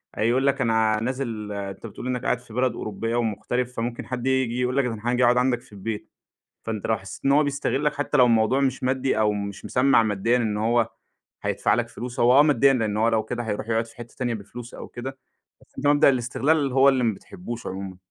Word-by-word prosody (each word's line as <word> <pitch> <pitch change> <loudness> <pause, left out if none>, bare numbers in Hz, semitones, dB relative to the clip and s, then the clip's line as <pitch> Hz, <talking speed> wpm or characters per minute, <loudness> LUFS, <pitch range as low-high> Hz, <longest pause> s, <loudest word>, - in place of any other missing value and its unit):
هيقول 125 +5 +2
لك 140 0 +1
أنا 110 -2 +2
نازل 115 -4 -3
أنت 100 +1 -6
بتقول 120 - -8
إنك 125 0 -2
قاعد 125 - +1
في 120 -3 -15
بلد 125 -1 +1
أوروبية 110 +3 -3
ومغترب، 120 +2 -1
فممكن 120 -1 -4
حد 125 0 -4
ييجي 130 -2 +1
يقول 125 +2 0
لك: 140 - +3
"أنا 115 -3 -4
حاجي 120 +1 +1
أقعد 120 +1 +4
عندك 125 -1 +2
في - - -21
البيت." 105 +2 -5 0.5
فأنت 110 -3 -4
لو 110 - +2
حسيت 95 -1 -10
إن 140 - +4
هو 150 +2 +5
بيستغلك 145 +1 0
حتى 145 +1 -1
لو 125 - +7
الموضوع 115 +2 +3
مش 135 -2 0
مادي 130 -2 0
أو 105 -1 +3
مش 100 -1 -5
مسمّع 130 -2 +4
ماديًا 110 +3 +1
إن 110 -3 -1
هو 115 +1 +2 0.5
هيدفع - - +1
لك - - 0
فلوس، 125 +2 -7
هو 125 +3 +6
آه - - +10
ماديًا 140 -2 +4
لأنه 110 -4 0
هو 115 - +4
لو 110 -1 +1
كده 120 +2 -4
هيروح 110 0 -4
يقعد 115 0 +1
في 115 - -16
حتة 120 -1 -11
تانية 125 -2 -1
بفلوس 115 +3 -9
أو - - -8
كده، 130 +2 -7 0.4
بس - - -22
أنت 145 - -1
مبدأ 145 -1 +6
الاستغلال 135 +3 +1
هو 135 +1 +6
اللي 130 -2 +1
ما 115 -3 +2
بتحبوش 120 - -8
عمومًا. 95 0 -6
120 Hz, 220 wpm, -24 LUFS, 110-130 Hz, 0.5 s, آه